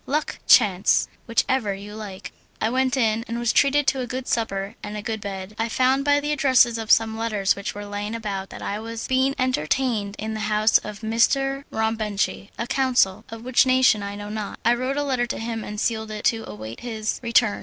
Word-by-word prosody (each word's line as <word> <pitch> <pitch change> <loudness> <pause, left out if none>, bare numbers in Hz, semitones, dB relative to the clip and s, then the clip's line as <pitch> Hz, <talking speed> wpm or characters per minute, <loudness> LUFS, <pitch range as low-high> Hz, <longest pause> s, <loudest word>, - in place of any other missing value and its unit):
luck! 300 +2 -2
chance! 200 -4 +5 0.2
whichever 230 -2 +1
you 205 +1 -9
like. 205 -3 -8 0.3
I 220 - 0
went 260 +1 +1
in 225 -2 +1
and 230 - -3
was 235 -1 +1
treated 285 +1 +3
to 270 - +2
a 250 - -3
good 255 +1 -5
supper 195 -3 -1
and 210 0 -6
a - - -4
good 220 -1 -3
bed. 195 0 -6
I 225 +1 0
found 260 +3 +2
by 290 0 +3
the 295 +1 -2
addresses 260 -5 +4
of 220 -1 -6
some 225 -1 +4
letters 215 -3 0
which 200 0 -5
were 205 0 -6
lying 205 +2 -4
about 200 -4 -4
that - - -9
I 205 - -3
was 230 +1 -6
being 260 +1 +2
entertained 240 - 0
in 220 +1 -4
the 215 - -4
house 215 +1 +4
of 210 +1 -9
M. 220 - -3
Rombenchi 225 -5 0
a 235 - -2
consul, 250 -7 +1
of 225 +1 -9
what 255 -1 +4
nation 255 -4 +4
I 200 0 -5
know 205 0 -7
not. 210 -1 -5
I 235 - +5
wrote 255 +3 -2
a 290 - +1
letter 255 -4 0
to - - -3
him 225 -1 -4
and 210 0 -6
sealed 220 -1 -1
it 215 -1 -6
to 225 -1 +1
await 110 +2 -8
his 220 -3 -3
return. 230 -3 +2
225 Hz, 215 wpm, -23 LUFS, 210-255 Hz, 0.3 s, chance